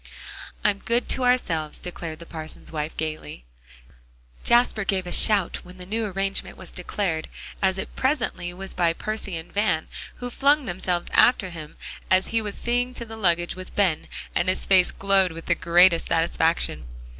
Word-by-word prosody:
"I'm 205 Hz, -1 st, +2 dB
good 235 Hz, +3 st, 0 dB
to 260 Hz, -, +2 dB
ourselves," 165 Hz, -12 st, +1 dB
declared 170 Hz, -3 st, -5 dB
the 170 Hz, -, -11 dB
parson's 160 Hz, -1 st, -7 dB
wife 155 Hz, 0 st, -4 dB
gaily. 155 Hz, -, -5 dB, 1.0 s
Jasper 235 Hz, -3 st, +4 dB
gave 195 Hz, -2 st, 0 dB
a 175 Hz, -, -6 dB
shout 200 Hz, -1 st, +4 dB
when 180 Hz, +1 st, -13 dB
the 180 Hz, -, -9 dB
new 220 Hz, +4 st, -2 dB
arrangement 195 Hz, 0 st, -2 dB
was 185 Hz, -, -9 dB
declared, 180 Hz, -3 st, -2 dB, 0.3 s
as 190 Hz, -1 st, +2 dB
it -, -, -6 dB
presently 245 Hz, -10 st, -1 dB
was 190 Hz, +2 st, -6 dB
by 170 Hz, -2 st, +2 dB
Percy 210 Hz, -1 st, -3 dB
and 160 Hz, +1 st, -9 dB
Van, 200 Hz, -6 st, +1 dB, 0.3 s
who 245 Hz, 0 st, -6 dB
flung 285 Hz, +2 st, +3 dB
themselves 175 Hz, -1 st, -2 dB
after 200 Hz, -7 st, +4 dB
him 155 Hz, -3 st, -9 dB, 0.3 s
as 185 Hz, 0 st, +3 dB
he 225 Hz, 0 st, +1 dB
was 210 Hz, -2 st, -5 dB
seeing 245 Hz, +1 st, -1 dB
to 235 Hz, -, -5 dB
the 225 Hz, 0 st, -9 dB
luggage 175 Hz, -5 st, +1 dB
with 185 Hz, 0 st, -10 dB
Ben, 185 Hz, -7 st, +1 dB, 0.3 s
and 175 Hz, +2 st, +1 dB
his 185 Hz, -, 0 dB
face 185 Hz, -2 st, +5 dB
glowed 195 Hz, -3 st, +2 dB
with 165 Hz, 0 st, -9 dB
the 170 Hz, -, +3 dB
greatest 170 Hz, 0 st, +4 dB
satisfaction. 165 Hz, -, 0 dB
185 Hz, 170 wpm, -24 LUFS, 170-215 Hz, 1.0 s, face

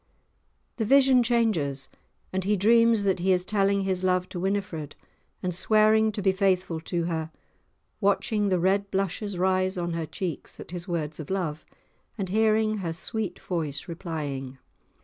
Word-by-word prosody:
The 225 Hz, -, 0 dB
vision 270 Hz, +1 st, +5 dB
changes, 210 Hz, -, +1 dB, 0.5 s
and 190 Hz, 0 st, -1 dB
he 205 Hz, +2 st, +1 dB
dreams 230 Hz, +2 st, +4 dB
that 195 Hz, -2 st, +1 dB
he 190 Hz, +2 st, +2 dB
is 180 Hz, -1 st, +2 dB
telling 200 Hz, 0 st, +2 dB
his 190 Hz, -1 st, -1 dB
love 185 Hz, 0 st, +1 dB
to 180 Hz, -, -5 dB
Winifred, 185 Hz, -6 st, -2 dB, 0.5 s
and 180 Hz, -1 st, -1 dB
swearing 215 Hz, +3 st, +4 dB
to 205 Hz, -, -4 dB
be 190 Hz, -, +4 dB
faithful 190 Hz, -3 st, +1 dB
to 170 Hz, +1 st, -2 dB
her, 160 Hz, -2 st, -2 dB, 0.7 s
watching 200 Hz, +1 st, +1 dB
the 185 Hz, -, +2 dB
red 195 Hz, +3 st, +1 dB
blushes 195 Hz, +1 st, -2 dB
rise 185 Hz, +1 st, +1 dB
on 175 Hz, -1 st, -2 dB
her 165 Hz, -1 st, -3 dB
cheeks 175 Hz, -4 st, -5 dB
at -, -, -9 dB
his 175 Hz, +1 st, -6 dB
words 155 Hz, -3 st, -3 dB
of 155 Hz, -, -7 dB
love, 170 Hz, -6 st, -3 dB, 0.5 s
and 195 Hz, -4 st, -3 dB
hearing 215 Hz, +1 st, +2 dB
her 170 Hz, -5 st, -3 dB
sweet 205 Hz, +2 st, -3 dB
voice 160 Hz, -3 st, -3 dB
replying. 145 Hz, -6 st, -5 dB
185 Hz, 160 wpm, -26 LUFS, 170-205 Hz, 0.7 s, vision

